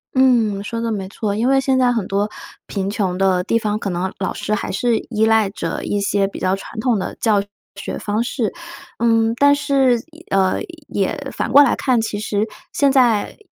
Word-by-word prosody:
嗯， 235 -6 +3
说 230 +2 -4
得 230 0 -1
没 195 -3 -3
错。 205 -1 -3
因 230 +4 0
为 270 0 +4
现 265 -1 +1
在 250 -1 +3
很 225 -6 -1
多 200 +2 0 0.4
贫 195 -1 -3
穷 195 -3 -1
的 190 -1 +2
地 230 +4 +1
方， 210 -1 -1
可 205 - -3
能 185 +1 -2
老 195 - -2
师 215 - -2
还 205 - -4
是 230 +4 +1
依 220 -2 +2
赖 220 -2 +3
着 165 -4 -4
一 205 - -1
些 200 0 +1
比 195 - -8
较 185 +1 +1
传 195 +3 -9
统 230 -1 +1
的 185 - -4
教 210 -3 +3 0.3
学 200 - -5
方 215 +2 -1
式。 240 -2 -2 0.5
嗯， 225 -1 +3
但 285 0 +5
是 275 -3 +2 0.2
也 325 +2 -15
嗯， 190 -1 +2 0.3
也 200 +7 -1 0.2
反 - - -3
过 285 - +8
来 265 - +2
看， 255 -4 +1
其 215 -2 -3
实， 210 +1 -1 0.3
现 280 -1 +3
在 245 -6 +2
220 Hz, 220 characters per minute, -19 LUFS, 200-245 Hz, 0.5 s, 过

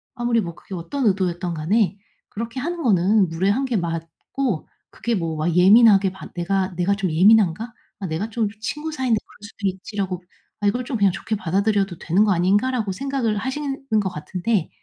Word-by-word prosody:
아무리 240 -2 +1
뭐 170 -6 -4
그게 190 - -12
어떤 215 +11 -3
의도였든 185 -3 0
간에 195 +6 +1 0.3
그렇게 230 +4 -5
하는 345 +2 -3
거는 200 - +3
무례한 195 +10 0
게 255 -3 -1
맞고 170 - -3 0.2
그게 235 -1 -2
뭐 165 -4 -2
'와 155 +2 0
예민하게 195 +1 +6
반 190 - -10
내가 185 +1 -1
내가 190 +3 +2
좀 190 -4 -2
예민한가? 210 +4 +4 0.3
아 195 - -4
내가 170 +7 -3
좀 225 -1 0
친구 300 +6 -4
사이인데 255 -5 +1
그럴 - - -20
수도 205 -1 -5
있지.'라고 190 -1 -4 0.4
'아 205 - 0
이걸 245 +5 +1
좀 245 -4 -2
그냥 200 -2 +4
좋게 215 +4 -3
받아들여도 195 0 0
되는 185 +6 +2
거 205 - +2
아닌가?'라고 205 +5 +1
생각을 245 -1 -1
하시는 270 +5 -3 0.2
거 190 - -1
같은데 180 +3 -2
200 Hz, 380 characters per minute, -22 LUFS, 180-230 Hz, 0.4 s, 예민하게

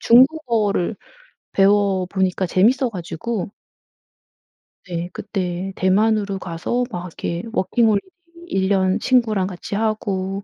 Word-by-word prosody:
중국어를 235 - +3 0.6
배워보니까 195 -2 +2
재밌어가지고 210 - 0 1.4
네 175 0 -4
그때 190 -2 -3
대만으로 200 +1 +2
가서 180 +8 -2
막 175 0 -5
이렇게 170 +2 -4
워킹홀리데이 220 - +2 0.4
1 190 - 0
년 190 +1 +2
친구랑 220 -7 +2
같이 185 +1 -6
하고 200 -3 -1
195 Hz, 240 characters per minute, -21 LUFS, 185-220 Hz, 1.4 s, 중국어를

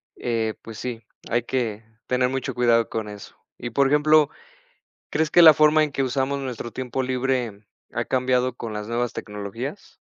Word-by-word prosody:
eh, 115 -2 -1
pues, 115 -1 -9
sí, 120 -2 -5 0.3
hay 120 0 +1
que 115 -4 -2 0.2
tener 125 0 +2
mucho 135 -1 -3
cuidado 115 -2 +3
con 110 -1 -3
eso. 105 -1 -11 0.2
Y, 120 - -4
por 135 +4 +2
ejemplo, 150 +1 +4 0.8
¿crees 160 -1 0
que 175 - +6
la 160 -2 +11
forma 155 +1 +5
en 150 - -5
que 135 - 0
usamos 135 +1 0
nuestro 125 -3 -5
tiempo 130 0 -3
libre 125 -5 -2 0.3
ha - - -1
cambiado 130 -1 +1
con 115 - -6
las 105 0 -5
nuevas 120 +1 -1
tecnologías? 105 - -7
125 Hz, 170 wpm, -24 LUFS, 115-135 Hz, 0.8 s, la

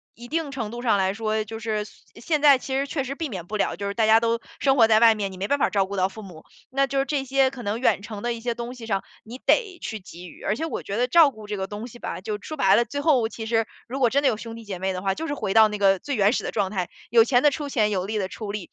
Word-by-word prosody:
一 240 +1 -11
定 320 -2 -2
程 230 -5 -4
度 240 0 -6
上 220 -5 +2
来 190 0 +1
说， 215 0 -1
就 220 +1 -8
是， 215 -1 -2
现 215 - -17
现 305 -3 +1
在 285 -3 +7
其 265 +1 -6
实 275 +1 0
确 275 -2 -2
实 270 - -4
避 315 +3 -4
免 185 - -6
不 215 +4 -4
了， - - 0
就 200 - -6
是 - - -3
大 220 0 +2
家 220 +1 +6
都 230 0 +1 0.2
生 270 -1 +3
活 225 -3 +7
在 220 0 +4
外 230 -1 +7
面， 200 -2 -3
你 - - -10
没 195 +2 -3
办 285 - +2
法 - - +3
照 195 -2 +1
顾 200 +1 -6
到 185 0 +3
父 215 +3 -10
母。 175 -6 -12 0.2
那 275 +1 +1
就 275 - -3
是 270 - +3
这 280 -2 -2
些 270 0 +3
可 260 -2 -9
能 215 +2 -3
远 255 - +2
程 215 -1 -8
的 240 - 0
一 235 - -4
些 235 0 -2
东 240 +1 -5
西 240 -3 -10
上， 195 -3 -1 0.2
你 235 +3 -8
得 415 -7 +2
去 220 - -5
给 180 -1 -11
予。 - - -15
而 210 - 0
且 320 - -3
我 325 - -4
觉 200 - -5
得 245 +3 +1
照 330 0 +7
顾 220 -5 -12
这 210 0 -4
个 190 0 -3
东 210 +3 -6
西 240 - -13
吧， - - -5
就 210 +1 -4
说 310 - -6
白 195 -9 +4
了， 235 - +3
最 285 +2 -4
后 265 -8 +3
其 225 0 -7
实 225 0 +1 0.2
如 265 +3 -4
果 250 -3 +4
真 280 +4 +1
的 275 - +5
有 215 - -1
兄 230 +1 -8
弟 230 - -10
姐 195 -4 -6
妹 190 +1 -1
的 185 - -4
话， 195 -1 0
就 325 +10 -5
是 290 - -2
回 195 -8 -2
到 220 0 +7
那 210 - -4
个 195 -2 +3
最 285 +6 -3
原 205 -2 +4
始 - - -2
的 - - -3
状 200 -3 0
态， 185 -4 -2 0.2
有 230 0 +6
钱 245 +1 +3
的 295 - +6
出 295 0 -4
钱， 220 -6 +1
有 185 -2 -1
力 215 +2 -3
的 190 -2 -2
出 205 -1 -6
力。 205 -4 -6
225 Hz, 360 characters per minute, -24 LUFS, 205-265 Hz, 0.2 s, 在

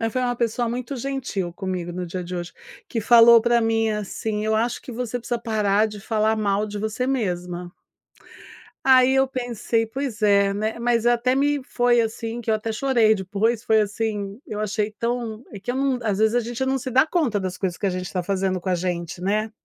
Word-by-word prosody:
Mas 225 -1 -1
foi 255 - 0
uma 245 -1 0
pessoa 235 0 0
muito 250 +3 -4
gentil 245 -9 -3
comigo 180 -2 -4
no 180 0 -4
dia 180 +2 -4
de 180 +1 -6
hoje, 175 0 -5 0.4
que 230 - -2
falou 235 +1 +8
pra 235 0 +3
mim 225 -1 +1
assim 210 +1 -3
"Eu 220 0 +1
acho 235 +2 0
que - - -10
você 245 0 -3
precisa 240 0 -3
parar 215 -2 +1
de 210 -1 -8
falar 220 +1 +1
mal 205 -1 0
de 210 0 -6
você 220 +4 -2
mesma". 180 -8 -2 1.2
Aí 260 0 +6
eu 270 0 +4
pensei 240 -3 -1
"Pois 250 -1 -4
é, 200 -1 +4
né", 215 +3 -2
mas 235 -1 +1
até 240 +1 +3
me 285 +1 +1
foi, 245 -2 +2
assim, 225 +1 -4
que 230 - -2
eu - - +4
até 215 +1 -3
chorei 230 -2 +3
depois, 210 +4 -1
foi, 220 0 +4
assim, 205 -1 -2
eu 210 - -5
achei 215 0 -1
tão 235 0 -3
é 205 - -8
que 205 +5 -4
eu - - -5
não 270 -1 +1
às 210 -3 -1
vezes 220 +1 +3
a 245 - +3
gente 240 +3 -3
não 265 0 +1
se 260 0 -4
dá 265 +4 +4
conta 295 - 0
das 185 -1 -4
coisas 185 -3 -3
que 205 - -1
a - - +3
gente 185 0 -5
tá 180 - -1
fazendo 190 0 -1
com 180 - -5
a 185 - +2
gente, 175 -1 -3
né. 215 +3 0
220 Hz, 220 wpm, -23 LUFS, 200-240 Hz, 1.2 s, falou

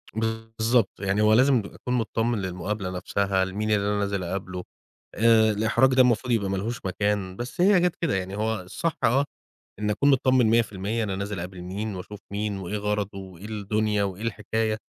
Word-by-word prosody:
بالضبط، 110 0 +1
يعني 100 +1 0
هو 105 0 +5
لازم 130 +3 +5
أكون 125 +4 -5
متطمّن 115 -1 0
للمُقابلة 95 +2 -3
نَفْسها، 95 +1 0
لمين 105 +3 -2
اللي 100 -1 +2
أنا 105 0 +1
نازل 100 -2 -1
أقابله. 90 0 -4 0.5
آآ 110 0 +5
الإحراج 110 +5 +3
ده 130 - +6
المفروض 125 0 +2
يبقى 100 -4 +1
مالهوش 105 +4 -3
مكان، 95 0 -1
بس 120 - -4
هي 195 0 +6
جات 175 -1 +1
كده، 165 - +1
يعني 95 +1 -3
هو 110 -1 -1
الصح 160 - -3
آه، 135 +5 +4 0.5
إن 105 0 -1
أكون 140 +7 +3
متطمّن 130 -2 +4
100% 110 -1 +1
أنا 95 -2 -2
نازل 100 0 -4
أقابل 90 +1 -6
مين 100 +4 -4
وأشوف 100 +3 -8
مين 100 0 -2
وإيه 95 +2 -4
غرضه 105 -1 -2
وإيه 95 -1 -10
الدنيا 105 -1 0
وإيه 95 +1 -4
الحكاية. 110 0 -1
105 Hz, 175 wpm, -25 LUFS, 95-115 Hz, 0.5 s, ده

